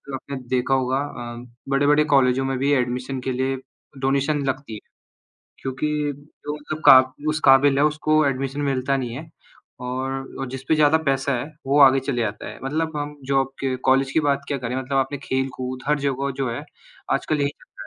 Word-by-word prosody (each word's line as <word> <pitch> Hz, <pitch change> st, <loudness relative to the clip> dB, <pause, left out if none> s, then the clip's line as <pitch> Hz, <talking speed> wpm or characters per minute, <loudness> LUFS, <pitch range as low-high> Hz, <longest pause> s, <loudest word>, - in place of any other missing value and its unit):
आपने 140 Hz, +1 st, -7 dB, 0.2 s
देखा 130 Hz, +1 st, +1 dB
होगा 130 Hz, 0 st, +1 dB
अ, 120 Hz, -4 st, -6 dB, 0.3 s
बड़े-बड़े 145 Hz, +2 st, +4 dB
कॉलेजों 135 Hz, -1 st, +3 dB
में 135 Hz, -1 st, -1 dB
भी 140 Hz, +2 st, +1 dB
एडमिशन 125 Hz, +1 st, -1 dB
के -, -, +1 dB
लिए 130 Hz, +1 st, -1 dB, 0.4 s
डोनेशन 140 Hz, +2 st, +1 dB
लगती 135 Hz, -3 st, -3 dB
है, 105 Hz, -, -6 dB, 0.8 s
क्योंकि 135 Hz, +2 st, -2 dB, 0.6 s
जो 150 Hz, 0 st, -3 dB
मतलब 150 Hz, +1 st, -6 dB
का 130 Hz, -, +11 dB, 0.3 s
उस 155 Hz, +1 st, 0 dB
काबिल 135 Hz, +1 st, +6 dB
है 140 Hz, -, +4 dB
उसको 155 Hz, 0 st, +2 dB
एडमिशन 135 Hz, +1 st, -2 dB
मिलता 135 Hz, -1 st, 0 dB
नहीं 125 Hz, -3 st, -4 dB
है 155 Hz, +5 st, -8 dB, 0.6 s
और 135 Hz, +1 st, -4 dB
जिसपे 135 Hz, +4 st, -1 dB
ज़्यादा 150 Hz, +1 st, +5 dB
पैसा 135 Hz, 0 st, +1 dB
है, 120 Hz, -, -4 dB, 0.2 s
वो 140 Hz, +2 st, +3 dB
आगे 135 Hz, 0 st, +7 dB
चले 130 Hz, -2 st, -2 dB
जाता 105 Hz, -2 st, -3 dB
है। -, -, -10 dB
मतलब 160 Hz, +3 st, -2 dB
हम 145 Hz, 0 st, -4 dB
जॉब 135 Hz, -1 st, +2 dB
के 135 Hz, -1 st, -1 dB
कॉलेज 135 Hz, +1 st, +3 dB
की 160 Hz, -, +2 dB
बात 140 Hz, -2 st, +1 dB
क्या 140 Hz, -, -1 dB
करें 125 Hz, -1 st, -4 dB
मतलब 130 Hz, +1 st, -2 dB
आपने 135 Hz, +2 st, 0 dB
खेल-कूद 130 Hz, -1 st, -3 dB
हर 150 Hz, 0 st, +2 dB
जगह 140 Hz, 0 st, -1 dB
जो 135 Hz, -3 st, -1 dB
है 115 Hz, -, -4 dB, 0.5 s
आजकल 155 Hz, -, 0 dB
यही 140 Hz, -, +2 dB
चल -, -, -17 dB
रहा -, -, -68 dB
135 Hz, 190 wpm, -23 LUFS, 130-145 Hz, 0.8 s, का